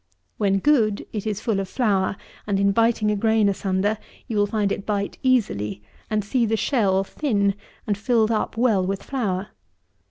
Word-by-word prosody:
When 195 -2 +2
good, 220 -4 +2
it 215 -1 -3
is 210 -2 -2
full 220 -5 0
of 195 -1 -4
flour, 200 -6 +1 0.3
and 200 -2 +1
in 200 0 +3
biting 225 0 +2
a - - +1
grain 220 0 +3
asunder, 200 +2 0 0.3
you 215 -4 +1
find 205 -1 0
it 200 - -2
bite 200 -1 -2
easily, 105 - 0 0.3
and 215 -2 0
see 245 +3 +1
the 220 +1 +1
shell 200 -7 +2
thin 200 -4 0 0.3
and 205 - 0
filled 220 +1 +2
up 225 0 -1
well 225 -6 +3
with 195 +1 -3
flour. 200 -8 -2
210 Hz, 170 wpm, -23 LUFS, 195-225 Hz, 0.3 s, in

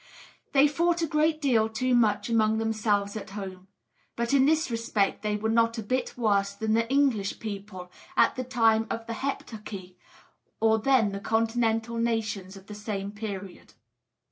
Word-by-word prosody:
They 280 +1 +6
fought 340 +3 +1
a - - +3
great 310 +1 +1
deal 235 -7 +2
too 250 +3 0
much 220 -4 +2
among 220 -2 +2
themselves 215 -2 0
at 215 - -6
home; 190 -2 -7 0.5
but 235 +2 -1
in 270 -1 +5
this 315 -3 +2
respect 225 -3 0
they 210 -1 -1
were 210 +1 -2
not 230 +1 +2
a 225 - -3
bit 255 +5 -2
worse 200 -4 +1
than 220 +1 -1
the 230 +1 +1
English 265 -8 +1
people 200 -4 -7 0.3
at - - +4
the 255 - -3
time 225 -3 +2
of 225 0 -4
the 230 - -4
Heptarchy 210 -7 -6 0.6
or 220 0 +3
than 230 -3 +3
the 200 - -4
Continental 225 +1 0
nations 215 -4 -2
of 190 - -14
the 210 - -9
same 205 -1 -4
period. 200 -3 -7
225 Hz, 170 wpm, -27 LUFS, 205-240 Hz, 0.6 s, They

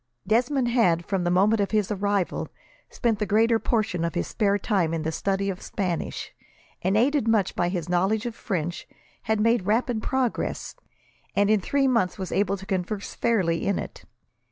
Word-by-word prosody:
Desmond 245 +5 +2
had, 180 -9 +2
from 195 -3 -1
the 175 - +1
moment 200 +5 +3
of 200 - 0
his 215 -2 0
arrival, 200 -2 -1 0.4
spent 230 -4 0
the 210 - 0
greater 225 +3 +3
portion 215 -8 0
of 170 +2 -2
his 175 - 0
spare 200 -2 +1
time 185 -5 0
in 160 - -3
the 160 - -1
study 195 +4 -1
of 190 -2 -3
Spanish, 180 -4 -3 0.5
and, 190 +4 +1
aided 270 +1 +2
much 215 -4 +2
by 175 - +1
his 175 -3 -3
knowledge 190 +5 +1
of 240 - -3
French, 175 -7 -4 0.4
had 220 -1 +2
made 225 -3 +2
rapid 230 +1 +1
progress, 260 -2 -2 0.6
and 205 +1 +3
in 215 -2 +3
three 275 +6 +1
months 230 -8 +1
was 190 -2 -5
able 200 0 +1
to 195 - -10
converse 195 +1 -3
fairly 185 -9 +1
in 200 - +1
it. - - -7
200 Hz, 180 wpm, -25 LUFS, 180-225 Hz, 0.6 s, moment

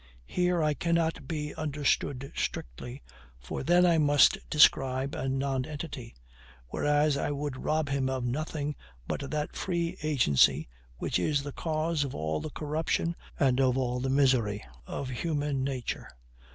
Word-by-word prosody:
Here 180 - +1
I 150 -1 +2
cannot 165 -1 0
be 150 -1 -3
understood 140 -2 -1
strictly; 120 - -4 0.4
for - - -5
then 175 +5 +4
I 170 -2 +4
must 145 -1 +5
describe 135 -2 +4
a 135 - -2
nonentity, 135 -1 -3 0.5
whereas 145 0 +2
I - - -1
would 145 -2 -3
rob 155 -1 +1
him 135 -1 0
of 130 -2 -2
nothing 150 +3 -2 0.3
but 140 - -3
that 150 -1 -3
free 170 -1 -2
agency 75 - +3 0.3
which - - 0
is 140 +8 +1
the 145 -1 -6
cause 155 -1 0
of 140 - -5
all 80 0 -1
the 155 - -4
corruption 160 +3 -1 0.2
and 135 -2 +3
of 130 -1 +3
all 125 -1 0
the 130 +1 -1
misery 125 -7 +2 0.2
of 135 - -4
human 145 0 -1
nature. 130 -3 -3
145 Hz, 145 wpm, -29 LUFS, 130-155 Hz, 0.5 s, must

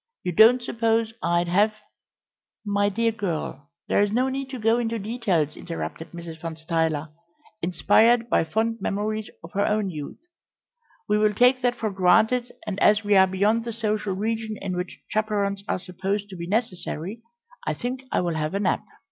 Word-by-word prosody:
You 180 - -1
don't 230 +7 +6
suppose 225 -1 0
I'd 170 +1 +1
have 205 +5 +3 0.5
" - - -58
"My 205 0 +2
dear 230 +3 +1
girl, 170 -8 -4 0.2
there's 205 0 +2
no 250 +4 +2
need 270 0 -4
to 265 - -5
go 225 +1 +2
into 230 -1 -1
details," 200 - -1
interrupted 165 -1 -6
Mrs. 170 -2 -9
Van 165 -1 -5
Stuyler, 160 -1 -1 0.5
inspired 220 +7 +4
by - - +3
fond 220 +8 -1
memories 215 +1 -2
of 165 - -10
her 200 - +1
own 210 -2 0
youth; 150 -3 -7 0.9
"we 210 - +2
will 210 -1 +2
take 250 +3 +4
that 245 -1 +1
for 220 -3 -2
granted, 220 +7 +3
and 205 -2 -3
as 210 0 +4
we 205 0 +3
are 190 0 +7
beyond 205 +5 +1
the 235 0 -4
social 215 -3 -1
region 220 +1 -2
in 190 -2 -3
which 180 0 -5
chaperons 205 -2 -1
are - - 0
supposed 195 +3 -3
to 190 - -8
be 170 -1 -6
necessary, 200 -1 -2 0.5
I - - 0
think 250 +2 -4
I - - +2
will 175 -2 -1
have 155 +2 -2
a - - +1
nap." 195 -2 +1
205 Hz, 180 wpm, -25 LUFS, 180-225 Hz, 0.9 s, are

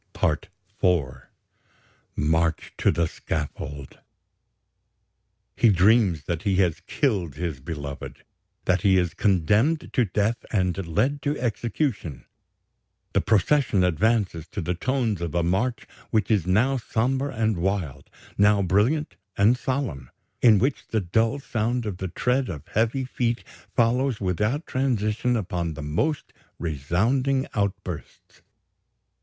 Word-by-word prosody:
"PART 80 +5 0 0.3
IV 70 -9 +1 0.9
"MARCH 80 +2 0
TO - - +2
THE 85 - +2
SCAFFOLD 75 -3 -5 1.6
"He 120 - +4
dreams 95 - +4
that 85 +1 -3
he 100 0 +1
has 90 -4 +2
killed 95 - 0
his 80 -4 -3
beloved, 70 -1 -7 0.4
that 95 -1 +2
he 95 -1 +4
is 90 -2 +1
condemned 105 - +2
to 125 - +3
death 105 +4 -1
and 95 -3 0
led 130 - 0
to 145 +2 -1
execution. 115 - -2 0.9
The - - +3
procession 110 - +2
advances 90 -2 +1
to 100 - -5
the 90 +2 -1
tones 115 -1 -1
of 85 -1 -3
a 85 - +2
march 100 +9 0 0.2
which 110 0 +1
is 100 -6 +2
now 120 +9 +3
sombre 130 +4 -1
and 110 -5 0
wild, 85 -7 -2 0.3
now 100 0 +5
brilliant 105 - +1 0.2
and 105 +5 +5
solemn, 125 - -3 0.3
in 110 -4 +7
which 130 +7 0
the 110 - 0
dull 110 +8 +1
sound 120 -1 -1
of 100 -4 -4
the 95 - -3
tread 125 +8 0
of 75 -7 -7
heavy 115 +5 0
feet 120 -2 -1 0.3
follows 120 +1 +2
without 105 - -1
transition 120 -2 0
upon 85 -5 -3
the 80 - -6
most 115 - -1 0.2
resounding 110 - 0
outbursts. 95 - -4
100 Hz, 125 wpm, -25 LUFS, 85-120 Hz, 1.6 s, in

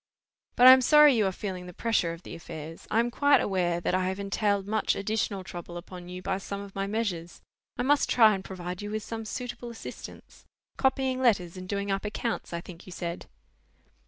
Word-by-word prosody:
"But 245 - +5
I 255 - +13
am 260 0 +8
sorry 300 +2 +7
you 215 -4 +2
are - - 0
feeling 185 -2 -6
the 180 - -10
pressure 225 -7 +1
of 165 +1 -9
the - - -9
affairs: 165 -1 -9
I 220 - +2
am 240 +1 +1
quite 285 +3 +4
aware 175 -3 0
that 175 - -1
I 185 0 +1
have 190 +1 -3
entailed 200 0 0
much 215 +2 0
additional 200 -1 -2
trouble 175 -1 -8
upon 180 0 -9
you 180 0 -7
by 190 - -1
some 200 0 -5
of 200 -1 -9
my 195 0 -2
measures: 195 -6 -3 0.3
I - - 0
must 290 +2 +3
try 220 -3 +6
and 190 -1 -4
provide 180 -1 -6
you 205 - -5
with 215 0 -3
some 225 0 -6
suitable 245 +1 -5
assistance. 235 - -10 0.3
Copying 265 -1 +1
letters 195 -9 +2
and 185 0 -8
doing 200 0 -2
up 195 0 -1
accounts, 220 +2 -3
I 170 0 -3
think 175 +1 -12
you - - -9
said?" 170 -1 -5
200 Hz, 215 wpm, -28 LUFS, 180-225 Hz, 0.3 s, I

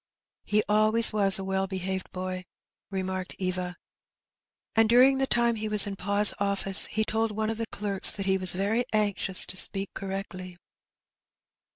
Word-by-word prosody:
"He 210 0 0
alwaj^ 215 +2 +3
was 200 -2 +3
a 195 - -6
well 190 0 -2
behaved 190 0 -5
boy/' 185 0 -6 0.4
remarked 190 -1 -5
Eva; 185 -1 -4 0.5
" - - -60
and 225 -1 +3
during 260 +3 +4
the 270 - 0
time 235 -2 0
he 215 0 -4
was 210 -1 +3
in 200 -1 -6
pa's 200 +2 +1
oflSce 200 -1 +3
he 220 0 -2
told 225 +1 -1
one 215 +1 -3
of 225 - -6
the 230 - -3
clerks 200 -3 +2
that 195 - -6
he 190 0 0
was 185 -1 +3
very 205 +6 -1
anxious 205 -3 0
to 185 - -8
speak 195 +1 +1
correctly." 190 -2 -7
200 Hz, 170 wpm, -26 LUFS, 190-215 Hz, 0.5 s, during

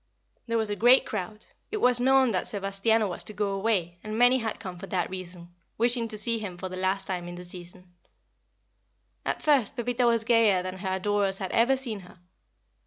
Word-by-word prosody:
There 230 0 0
was 220 -2 -1
a - - -1
great 245 +5 +5
crowd. 210 -1 -5 0.2
It 430 - -2
was 250 - +4
known 265 0 +4
that 185 - -1
Sebastiano 205 +2 +1
was 175 - -3
to 215 - -3
go 205 -1 -1
away, 195 -4 -1
and 215 0 -5
many 245 +2 +5
had 225 -2 -4
come 185 -4 -8
for 195 - -8
that 180 -2 -2
reason, 175 -2 -8 0.2
wishing 235 0 +3
to 215 -1 -4
see 230 +2 +2
him 195 -5 -6
for 185 +1 -6
the 185 - -7
last 190 +1 -1
time 180 -2 -4
in 175 - -7
the 180 0 -9
season. 180 0 -11 1.3
At - - -2
first 280 -8 +2
Pepita 245 0 0
was 230 -1 +2
gayer 225 -5 +3
than 185 0 -6
her 190 0 -2
adorers 200 0 0
had 190 -2 -5
ever 250 +4 +3
seen 235 -6 -4
her. 180 -1 -15
205 Hz, 205 wpm, -27 LUFS, 185-230 Hz, 1.3 s, great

